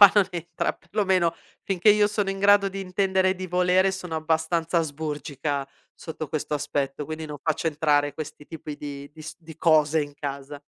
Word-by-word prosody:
qua 200 -2 +11
non 205 -3 +5
entra 175 -1 -2
per - - -27
lo 210 0 +2
meno, 180 -3 +2 0.3
finché 195 +1 +4
io 210 0 +5
sono 205 -1 -1
in 195 - -4
grado 200 0 +5
di 195 0 -6
intendere 190 0 +1
e - - 0
di 185 0 -6
volere, 180 +2 +3
sono 185 -3 -5
abbastanza 160 +1 +1
asburgica 145 -2 -3 0.3
sotto 160 -2 -7
questo 150 0 -2
aspetto, 145 -1 -2
quindi 155 +1 -5
non 150 -1 -7
faccio 160 +1 -1
entrare 145 -2 +2
questi 150 -1 -8
tipi 155 -2 -7
di 140 -1 -7
di 160 - -14
s 155 - -7
di 160 -2 -12
cose 155 -1 +4
in 145 -1 -5
casa. 140 0 -6
160 Hz, 195 wpm, -25 LUFS, 150-185 Hz, 0.3 s, qua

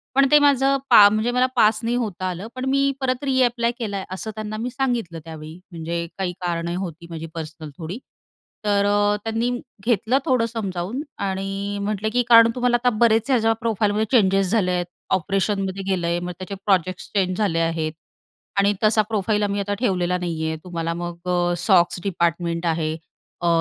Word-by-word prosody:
पण 275 0 +5
ते 300 - +8
माझं 275 -1 +4
पा 205 - +9
म्हणजे 215 +3 0
मला 250 +1 +3
पास 215 -2 +4
नाही 235 +1 0
होता 205 -6 -3
आलं. 180 +4 -5
पण 255 0 -4
मी 275 +1 +2 0.2
परत 255 0 -1
रीअप्लाय 245 -3 +2
केला 210 -4 -3
आहे." 190 - -5
असं 215 +4 -5
त्यांना 215 0 -5
मी 235 +3 -3
सांगितलं 240 -10 -2
त्यावेळी 160 -1 -9 0.2
म्हणजे 170 0 -4
काही 185 -2 -1
कारणं 170 -1 -2
होती 170 -3 -6
माझी 165 -1 -6
पर्सनल 160 -1 -7
थोडी. 175 +4 -6 0.7
तर 200 -1 +2
अ, 205 0 +3
त्यांनी 225 +2 -1 0.4
घेतलं 235 +2 +2
थोडं 255 -3 +2
समजावून 210 0 -4 0.3
आणि 195 +1 -3
म्हटले 210 +1 -1
की 245 - +3
"कारण 230 0 +8
तुम्हाला 245 -1 +2
आता 250 - +5
बरेच 225 +2 +3
ह्याच्या 225 -3 +3
प्रोफाईलमध्ये 215 -1 +1
चेंजेस 195 -5 +3
झाले 205 -5 +2
आहेत. 180 -1 0 0.3
ऑपरेशनमध्ये 195 +1 0
गेलं 175 -3 0
आहे. 170 0 0
मग 180 0 -4
त्याचे 190 +1 -6
प्रोजेक्ट्स 185 -2 0
चेंज 185 -2 +1
झाले 195 -6 +1
आहेत. 165 -1 -1 0.7
आणि 200 +1 +3
तसा 215 0 +5
प्रोफाईल 210 0 +1
आम्ही 205 0 0
आता 205 +1 -2
ठेवलेला 180 -6 +1
नाही 165 -3 -2
आहे. 160 0 -2
तुम्हाला 165 -2 -3
मग 175 +1 -6
अ, 175 0 +1
सॉक्स 175 -1 +3
डिपार्टमेंट 170 -2 -1
आहे. 160 -1 0 0.5
अ, 175 - 0
195 Hz, 180 wpm, -22 LUFS, 175-225 Hz, 0.7 s, पा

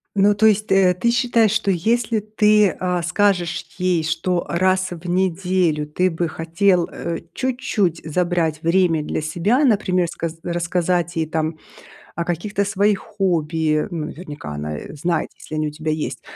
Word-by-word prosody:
Ну, 200 +1 +4
то 220 +2 +4
есть, 215 -1 +1
э, 185 -2 +4
ты 235 +3 +2
считаешь, 235 -4 +3
что 220 -2 0
если 220 +5 +1
ты, 210 -1 +3
а, 180 -2 -1
скажешь 180 -2 +1
ей, 180 -3 +1
что 175 +2 -1
раз 185 +2 +2
в 175 0 -8
неделю 180 -3 +1
ты 180 +5 0
бы 170 +1 -2
хотел, 170 +2 +1
э, 170 -1 -4
чуть-чуть 240 -9 -1
забрать 165 -1 0
время 165 -2 +2
для - - -3
себя, 175 - +1
например, 190 -8 +2
ска 165 0 -4
рассказать 175 0 -1
ей 160 -1 0
там 155 0 -2 0.6
о 170 - -2
каких-то 195 +4 -1
своих 200 0 +1
хобби. 165 -7 0
Ну, 160 -3 -4
наверняка 150 - -8
она 75 +1 -4 0.2
знает, 170 -1 0
если 155 - -8
они 155 0 0
у - - -4
тебя 155 +1 -3
есть, 155 -1 -3
180 Hz, 160 wpm, -21 LUFS, 165-200 Hz, 0.6 s, Ну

